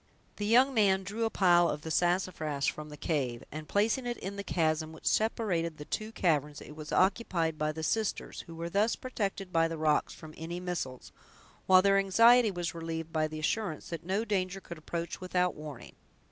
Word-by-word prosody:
The 205 - -2
young 255 +5 +5
man 195 -4 +3
drew 210 +4 -2
a - - +1
pile 175 -4 +4
of 150 - -4
the 160 - -5
sassafras 175 -5 0
from 150 0 -2
the 150 - -10
cave, 135 -6 -2
and 155 +1 -7
placing 225 +5 +1
it 240 - -2
in 195 +1 -6
the 200 - -5
chasm 160 -3 0
which 160 - -14
separated 180 -8 0
the 150 - -8
two 215 +6 -4
caverns, 150 -8 0
it 150 - -11
was 155 -1 -8
occupied 185 -5 +1
by 155 0 +1
the 160 +1 -6
sisters, 220 +5 -1
who 165 - -9
were 165 +1 -4
thus 205 +6 +1
protected 200 -7 -4
by 165 0 +4
the 165 0 -5
rocks 155 -1 +2
from 155 -1 -11
any 170 +2 -5
missiles, 175 -8 -5 0.6
while 185 0 +7
their 195 0 +5
anxiety 230 +4 +6
was 175 -3 -3
relieved 165 -1 -5
by 155 -1 +1
the 155 0 -7
assurance 160 +2 -2
that 170 -1 -5
no 195 +6 -1
danger 195 -3 -1
could 170 -4 -9
approach 170 +3 -5
without 180 -1 +1
a - - -14
warning. 150 -5 -9
175 Hz, 200 wpm, -30 LUFS, 155-200 Hz, 0.6 s, while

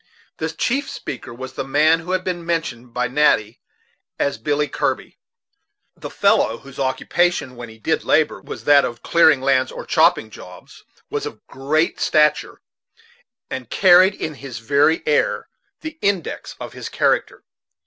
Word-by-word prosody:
The 160 - -3
chief 260 - -1
speaker 130 - -7
was 130 +2 -8
the - - -4
man 150 +4 +3
who 175 +3 -5
had 185 0 0
been 175 -2 -3
mentioned 155 -8 -3
by 125 +1 -1
Natty 120 -5 +1 0.6
as 140 -5 -1
Billy 145 +5 0
Kirby. - - -3 0.8
This - - -9
fellow, 115 - +2
whose 135 +1 -13
occupation, 140 +1 0
when 120 -1 -9
he 110 - -14
did 110 - -1
labor, - - +1
was - - -9
that 145 -1 +5
of 120 -1 -5
clearing 160 -5 +4
lands, 130 -1 +2
or - - -8
chopping 110 - +2
jobs, 90 -2 -13 0.3
was - - -2
of - - -11
great 155 +5 -1
stature, 150 -1 +1 0.9
and 125 -3 -5
carried 185 0 +5
in 155 - -4
his 135 -4 -9
very 140 +7 +2
air 150 - +1 0.3
the 315 0 -8
index 195 -5 -2
of - - -8
his - - -7
character. - - 0
145 Hz, 155 wpm, -20 LUFS, 125-165 Hz, 0.9 s, that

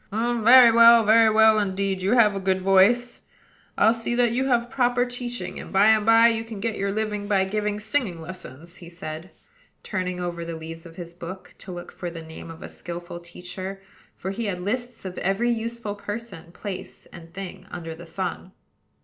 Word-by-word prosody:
"Very 235 +2 +6
well, 230 0 +8
very 225 +1 +6
well, 220 0 +5
indeed: 195 -1 -1
you 195 +5 +1
have 225 -4 +5
a 195 - -3
good 190 0 0
voice. 195 +6 +3 0.6
I'll 220 - +5
see 230 +1 -2
that 240 -1 +3
you 260 +3 0
have 240 -2 +2
proper 245 -1 +2
teaching; 245 -7 -5
and, - - -9
by 200 +3 +5
and 220 -1 +3
by, 225 +1 +7
you 225 -1 -1
can 225 -2 -8
get 220 +1 -2
your 200 0 -1
living 210 -1 -3
by 195 -2 +2
giving 210 +1 -2
singing 215 -5 -1
lessons," 170 -1 -9
he 170 - -11
said, 160 0 -7 0.5
turning 185 -2 -3
over 175 -1 -4
the 165 0 -5
leaves 165 +1 -8
of 165 - -14
his 170 -1 -8
book, 180 +2 -9
to 190 - -9
look 175 0 -8
for 175 - -6
the 165 -1 -8
name 160 +1 -10
of 165 0 -10
a - - -6
skilful 175 0 -7
teacher; 180 +3 -8 0.4
for 190 - -4
he 230 +4 -4
had 190 -3 -2
lists 240 +3 -3
of 185 -1 -5
every 195 +6 +1
useful 230 -2 -3
person, 205 -5 -7
place, 190 0 -8
and 165 -1 -12
thing 185 0 -8
under 165 -2 -6
the 170 +1 -12
sun. 185 +2 -5
195 Hz, 195 wpm, -24 LUFS, 180-230 Hz, 0.6 s, well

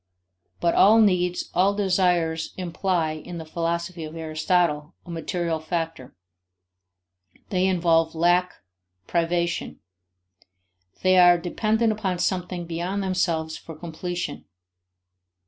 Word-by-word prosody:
But 170 -1 +2
all 220 +3 +6
needs, 180 -4 +2
all 195 +2 +3
desires 180 -5 +1
imply, 175 -2 -1
in 155 +3 -7
the 160 - -7
philosophy 170 +1 -3
of 155 +1 -8
Aristotle, 155 -1 0
a 175 - -9
material 170 -1 -2
factor; 160 -4 -4 1.3
they 185 -1 +1
involve 165 -3 +2
lack, 175 +2 +2 0.5
privation; 170 - -1 1.2
they 185 0 +5
are 175 0 +7
dependent 215 +6 0
upon 195 -4 -2
something 180 -1 -2
beyond 175 +4 -3
themselves 170 -4 -1
for 165 - -10
completion. 175 +2 -5
175 Hz, 105 wpm, -24 LUFS, 165-185 Hz, 1.3 s, are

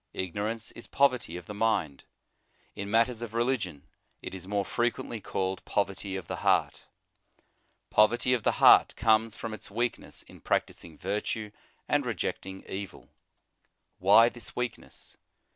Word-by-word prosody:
Ignorance 105 +5 -3
is 115 - -9
poverty 125 -11 +1
of 90 - -9
the 105 - -7
mind. 100 -10 0 0.7
In 100 0 -5
matters 115 +2 +2
of 115 -1 -6
religion 110 - -1 0.4
it - - -6
is 95 -1 -8
more 100 0 0
frequently 120 -1 -2
called 95 -1 -2
poverty 100 -1 -2
of 95 -3 -5
the - - -5
heart. - - +1 1.1
Pov 105 0 +7
erty 120 +2 +1
of 120 - -3
the - - +2
heart - - +6
comes 110 0 +2
from 115 -1 -6
its 110 - -8
weakness 120 +4 -3
in - - -16
practising 80 -3 -2
virtue 105 +2 -3 0.4
and - - +2
rejecting 95 0 -4
evil. 95 0 -7 0.9
Why 100 +5 +7
this 120 -4 -7
weakness? 125 -2 -6
105 Hz, 145 wpm, -29 LUFS, 95-115 Hz, 1.1 s, Pov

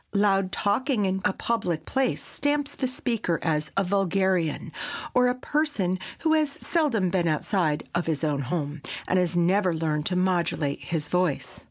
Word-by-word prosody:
Loud 195 -2 +3
talking 215 +2 +1
in 190 0 0
a - - +3
public 190 -7 -1
place 265 -1 0
stamps 290 0 -1
the 260 - -2
speaker 230 -9 -1
as 150 -2 0
a 195 - +4
vulgarian, 190 -3 +1 0.4
or 250 0 +5
a 250 - +1
person 255 - 0 0.2
who 320 -1 +3
has 305 -3 +2
seldom 260 - +1
been 175 -2 +1
outside 155 -1 0
of 175 0 -1
his 160 -1 -1
own 145 -3 +1
home, 145 +1 -3 0.3
and 185 - +3
has 180 -1 0
never 180 +1 +3
learned 155 -2 -1
to 185 - -1
modulate 175 -6 +1
his 165 -4 -3
voice. 180 -5 -1
185 Hz, 165 wpm, -26 LUFS, 165-230 Hz, 0.4 s, or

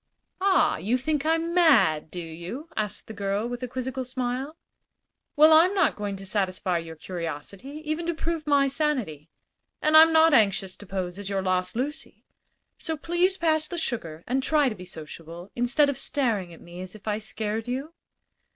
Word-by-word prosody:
"Ah, 390 -1 +3
you 230 +6 0
think 300 +3 -1
I'm 330 +1 +1
mad, 270 - +4
do 180 - -6
you?" 175 - -7
asked 210 -2 -3
the 220 - -9
girl, 200 +2 -1
with 245 0 -5
a 250 - -3
quizzical 260 +1 -4
smile. 255 +4 -3 0.8
"Well, 310 +1 +7
I'm 345 +5 +6
not 370 -6 +3
going 205 -1 -4
to 195 0 -9
satisfy 185 -3 0
your 165 -1 -8
curiosity, 180 - -6
even 310 +2 -2
to 340 - -1
prove 320 -1 -3
my 280 -1 +4
sanity; 255 - -2 0.5
and 305 +1 +2
I'm 320 +1 +9
not 320 0 +6
anxious 195 -5 +3
to 205 - -13
pose 185 -1 -4
as 200 -1 -5
your 195 -1 -1
lost 185 0 0
Lucy. 285 +6 -5 0.5
So 320 -2 -3
please 345 +5 +1
pass 315 -3 +1
the 350 - -5
sugar 170 - -4
and 260 +3 0
try 295 -1 +3
to - - -4
be 180 -2 -10
sociable, 165 +1 -10
instead 245 +5 +3
of 280 -2 -1
staring 225 -12 0
at 165 - -13
me 175 +1 -10
as 185 +2 -8
if 215 0 -14
I 210 0 0
scared 220 +1 -4
you." 270 +6 -4
245 Hz, 185 wpm, -26 LUFS, 185-305 Hz, 0.8 s, I'm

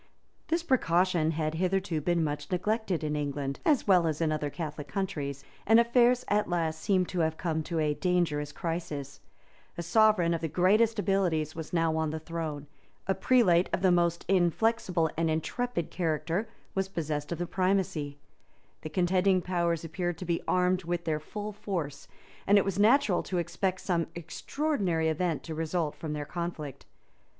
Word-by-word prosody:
This 335 +1 0
precaution 180 - +2
had 155 -1 -1
hitherto 185 -1 0
been 170 +1 +1
much 145 0 -3
neglected 195 -1 0
in 150 -1 -1
England, 140 -2 -3
as 295 -8 +2
well 180 -4 +5
as 155 -2 -1
in 160 -2 +1
other 150 -1 -1
Catholic 150 -2 -6
countries; 145 -6 -3 0.2
and 225 +2 +7
affairs 240 +1 +4
at 210 -1 +1
last 160 -2 -1
seemed 185 -3 +2
to 180 - -3
have 160 -1 +1
come 160 -2 -1
to 165 +2 -4
a 150 -1 +2
dangerous 160 -4 0
crisis: 155 -6 -4 0.6
a 170 - -3
sovereign 180 -2 +4
of 165 - -2
the 165 - -1
greatest 210 +8 +3
abilities 175 -6 0
was 160 -1 -6
now 165 -2 +1
on 160 -1 0
the 155 - -3
throne: 160 -3 -5 0.4
a 190 - +2
prelate 190 -4 +3
of 185 - -1
the 185 - +5
most 170 -1 +1
inflexible 180 -2 +2
and 165 0 +1
intrepid 170 +4 -2
character 170 +5 -1 0.2
was 195 0 0
possessed 155 -5 -3
of 170 - -2
the 175 - -2
primacy: 185 -5 0 0.6
the 155 - -6
contending 185 +3 +2
powers 170 -2 -1
appeared 175 +1 -3
to 185 - -6
be 170 -1 0
armed 180 0 +2
with 175 0 -3
their 155 -2 0
full 210 +7 -6
force 170 -9 -4 0.4
and 205 +1 +6
it 200 - +3
was 195 0 -2
natural 220 -3 +4
to 185 - -3
expect 185 +2 -1
some 170 -3 0
extraordinary 175 - -1
event 160 0 -1
to 160 - -6
result 160 0 -1
from 155 -2 -5
their 150 -1 -4
conflict. 170 -4 -5
170 Hz, 170 wpm, -29 LUFS, 160-190 Hz, 0.6 s, and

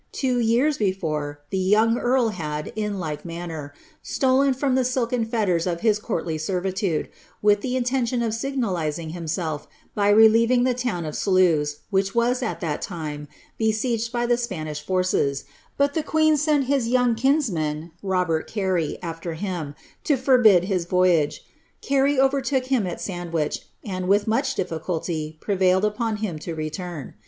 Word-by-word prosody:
Two 255 -3 0
years 240 +6 +2
before, 155 -8 -2
le 190 - +1
yonng 215 +5 +3
earl 245 -1 +2
had, 150 -6 -5
in 210 -2 -2
like 155 -5 -4
manner, 165 -4 -6 0.3
stolen 270 +1 +2
from 265 +1 0
the 260 0 +3
silken 245 -1 0
fetters 205 -7 0
of 170 -1 -2
his 215 -2 +3
oortly 165 -7 -3
servitude, 185 -1 -1 0.4
with 205 -1 +4
the 250 +2 -2
intention 245 -1 0
of 225 -2 -1
signalizing 185 - -2
himself 165 -2 -3 0.3
by 205 -1 +2
relieving 225 +3 +5
le 255 0 +2
town 240 -9 -2
of 150 - -5
Sluys, 165 -7 +2
which 195 +1 +1
was, 245 +2 +2
at 245 - -3
that 155 -4 -2
time, 150 -6 -5 0.3
besieged 225 +1 0
by 240 -1 0
the 240 0 +2
Spanish 155 -11 -4
ffces, 180 -6 0 0.3
but 280 0 +2
the 320 - 0
queen 310 +1 +3
sent 295 -1 +2
his 270 -3 +1
young 245 0 +3
kinsman, 180 - 0
Robert 180 -5 0
Carey, 185 -7 -1
after 165 0 -5
him, 165 -5 -4 0.2
> - - -39
forbid 245 -8 +5
his 185 -3 -1
voyage: 175 -4 +2 0.4
Carey 275 0 +2
overtook 270 -1 +2
him 255 -7 +1
at 175 - -5
Sandwich, 170 -5 -3 0.2
and, 185 -3 -3
with 200 +2 +3
much 265 +5 0
ifficnlty, 160 -2 -3
prevailed 190 0 +2
upon 220 +1 -1
him 205 -7 -4
to 165 +1 -5
return. 155 -1 -5
200 Hz, 155 wpm, -24 LUFS, 165-245 Hz, 0.4 s, relieving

